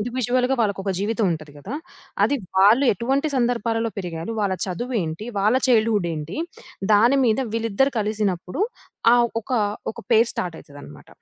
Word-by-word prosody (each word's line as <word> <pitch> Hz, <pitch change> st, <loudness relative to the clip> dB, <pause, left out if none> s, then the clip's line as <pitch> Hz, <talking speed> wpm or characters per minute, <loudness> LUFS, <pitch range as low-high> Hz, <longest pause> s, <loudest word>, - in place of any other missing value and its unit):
ఇండివిడ్యువల్‌గా 250 Hz, +2 st, 0 dB
వాళ్ళకొక 200 Hz, -3 st, 0 dB
జీవితం 215 Hz, +2 st, 0 dB
ఉంటది 155 Hz, -2 st, -7 dB
గదా! 190 Hz, -, -7 dB, 0.5 s
అది 285 Hz, -, +1 dB, 0.2 s
వాళ్ళు 215 Hz, +8 st, +6 dB
ఎటువంటి 270 Hz, -, 0 dB
సందర్భాలలో 230 Hz, -2 st, 0 dB
పెరిగారు? 175 Hz, +2 st, -5 dB
వాళ్ళ 195 Hz, -2 st, 0 dB
చదువేంటి? 190 Hz, -2 st, -3 dB
వాళ్ళ 210 Hz, +4 st, +3 dB
చైల్డ్‌హుడ్ 220 Hz, -6 st, +3 dB
ఏంటి? 155 Hz, -, -5 dB, 0.5 s
దాని 235 Hz, +7 st, +5 dB
మీద 225 Hz, -1 st, +2 dB, 0.2 s
వీళ్ళిద్దరూ 230 Hz, +4 st, +1 dB
కలిసినప్పుడు 205 Hz, -, -1 dB, 0.5 s
ఆహ్, 240 Hz, -1 st, +4 dB
ఒక -, -, -18 dB, 0.4 s
ఒక -, -, -34 dB, 0.2 s
పెయిర్ 230 Hz, +1 st, +5 dB
స్టార్ట్ 175 Hz, -2 st, -4 dB
అయితదన్నమాట. 140 Hz, -, -13 dB
215 Hz, 135 wpm, -23 LUFS, 190-240 Hz, 0.5 s, వాళ్ళు